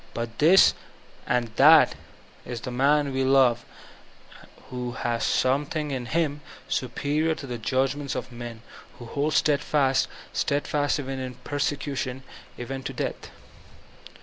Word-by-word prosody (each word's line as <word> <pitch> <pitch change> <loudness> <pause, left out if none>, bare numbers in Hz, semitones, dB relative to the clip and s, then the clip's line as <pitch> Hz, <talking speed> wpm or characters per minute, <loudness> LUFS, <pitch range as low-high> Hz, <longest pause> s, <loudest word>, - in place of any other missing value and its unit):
But 115 0 -5
that 175 +6 +7 1.7
is 120 -1 -4
the 125 - -5
man 140 +2 +2
we 135 0 0
love: 130 -3 +4 1.1
who 125 -1 -4
has 120 -1 -2
something 145 +3 0
in 125 -3 -4
him 150 -1 -1 0.3
superior 150 +5 -1
to 140 - -8
the 120 -3 -5
judgments 135 +4 -1
of - - -5
men; 120 -1 -8 0.3
who 120 - -10
holds 145 +6 -1
steadfast 140 -2 +2 0.2
— - - -22
steadfast 145 +1 0
even 135 -1 -4
in 130 -1 -5
persecution, 140 -2 -3 0.3
even 130 +2 -5
to - - -6
death. - - -4
135 Hz, 120 wpm, -25 LUFS, 125-145 Hz, 1.7 s, that